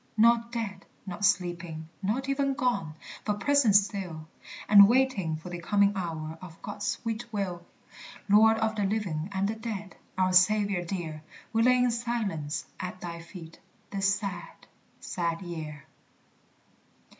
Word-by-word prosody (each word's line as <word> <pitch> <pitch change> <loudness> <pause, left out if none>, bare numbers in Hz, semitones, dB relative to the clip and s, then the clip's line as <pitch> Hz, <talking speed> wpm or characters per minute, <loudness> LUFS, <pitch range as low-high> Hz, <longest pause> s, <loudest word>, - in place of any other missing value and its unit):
Not 235 +1 +4
dead, 210 -5 -5 0.2
not 190 +1 -6
sleeping, 175 -4 0
not 225 +7 -1
even 275 0 0
gone, 200 - -1 0.3
But 210 -1 -1
present 280 -7 +4
still, 190 -6 +1 0.4
And 200 -1 +9
waiting 240 -10 +2
for 165 +3 -9
the 175 - -5
coming 200 +3 +3
hour 160 -3 -4
Of 170 -3 -11
God's 205 0 -5
sweet 230 +1 -3
will. 185 -5 -3 0.6
Lord 220 +2 +6
of 220 0 0
the 210 - 0
living 190 -5 -2
and 195 0 0
the 215 - -1
dead, 215 -3 -6 0.2
Our 185 0 +2
Saviour 200 0 +4
dear! 165 -4 -5 0.3
We 225 - +3
lay 250 +2 +5
in 250 -1 +3
silence 225 -11 -2
at 185 0 -5
thy 170 -1 -6
feet 165 -1 -11 0.3
This 195 -1 +2
sad, 195 -4 -7 0.3
sad 170 0 -3
year. 155 -4 -7
195 Hz, 145 wpm, -28 LUFS, 175-220 Hz, 0.6 s, And